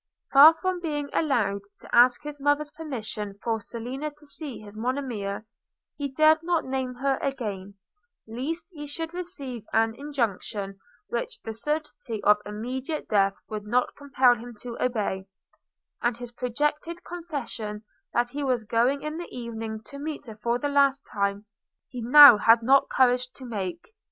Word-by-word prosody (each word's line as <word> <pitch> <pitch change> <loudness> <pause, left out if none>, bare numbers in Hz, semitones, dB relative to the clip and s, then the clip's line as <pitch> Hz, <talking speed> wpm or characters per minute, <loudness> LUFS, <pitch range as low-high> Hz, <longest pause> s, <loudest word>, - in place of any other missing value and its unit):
Far 300 +4 +10
from 370 +2 -2
being 295 -4 -3
allowed 215 -10 +1 0.2
to - - -4
ask 245 +1 +6
his 295 -1 -7
mother's 290 +1 +1
permission 215 -9 -5
for 225 -2 -1
Selina 250 +7 -5
to 295 0 -18
see 290 -3 -6
his 210 -1 -12
Monimia, 225 -4 -3 0.5
he 285 -1 -3
dared 310 +3 +4
not 340 -1 0
name 260 -1 -3
her 270 +1 0
again, 205 -8 -4 0.5
lest 285 +9 -4
he 295 -2 -7
should 325 +3 -4
receive 280 - -6
an 225 0 +3
injunction 220 -7 -3 0.3
which 235 - -3
the 225 - -5
certainty 250 -3 -3
of 210 0 +6
immediate 255 +8 -4
death 195 -2 +3
would 210 -1 -6
not 245 +3 +1
compel 265 -3 +3
him 240 0 -9
to 240 -1 -6
obey; 205 -6 -1 0.7
and 240 -1 0
his 245 -1 -8
projected 295 +8 -2
confession 265 -11 -5 0.3
that 240 0 0
he 290 +2 -3
was 250 -4 0
going 240 +6 +1
in 305 +2 -4
the 345 - -7
evening 225 -2 -6
to 280 +5 -10
meet 300 +1 -5
her 220 -2 -10
for 235 0 +1
the 290 - -2
last 280 -1 +3
time, 200 0 -1 0.4
he 250 - -6
now 260 0 +10
had 230 +2 +5
not 270 +3 +4
courage 250 -1 +3
to 260 - -11
make. 195 - -5
250 Hz, 160 wpm, -26 LUFS, 225-290 Hz, 0.7 s, Far